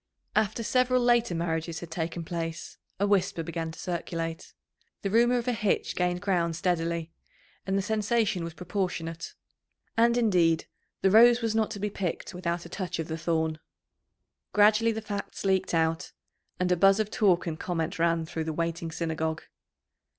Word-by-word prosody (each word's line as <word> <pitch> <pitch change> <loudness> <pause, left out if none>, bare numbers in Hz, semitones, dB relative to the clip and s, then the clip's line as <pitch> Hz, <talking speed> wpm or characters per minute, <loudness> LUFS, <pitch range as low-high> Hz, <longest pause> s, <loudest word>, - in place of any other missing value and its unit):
After 215 +2 +1
several 255 +2 +3
later 240 -6 +3
marriages 165 0 -2
had 170 -1 -9
taken 165 +1 -3
place, 165 -1 -5 0.2
a 200 - +3
whisper 195 -4 +1
began 165 0 -4
to - - -12
circulate. 165 -2 -4 0.5
The 195 - -1
rumour 240 +3 +4
of 240 0 -3
a 250 - +2
hitch 210 -3 0
gained 180 0 0
ground 170 -4 +1
steadily, 170 -2 -1 0.6
and 190 +1 +1
the 195 - 0
sensation 215 -2 +1
was 165 -1 -6
proportionate. 175 -3 -3 0.6
And, 235 +1 +4
indeed, 180 -8 +3 0.4
the 190 - +5
rose 235 +3 +7
was 225 -1 +1
not 220 -1 +1
to 215 -2 -6
be 210 +1 -2
picked 190 -2 -3
without 175 -1 -3
a - - -7
touch 185 -1 -4
of 165 0 -4
the 160 - -2
thorn. 160 -1 0 0.9
Gradually 215 +2 +5
the 220 0 -4
facts 200 -2 -5
leaked 190 -2 +1
out, 160 0 0 0.5
and 180 0 +1
a - - +5
buzz 195 +3 +5
of 215 0 -1
talk 185 -5 +3
and 160 -2 -4
comment 165 -2 -2
ran 165 -1 +2
through 160 0 -4
the 160 - -2
waiting 165 +1 -2
Synagogue. 160 -1 -2
180 Hz, 170 wpm, -28 LUFS, 165-210 Hz, 0.9 s, rose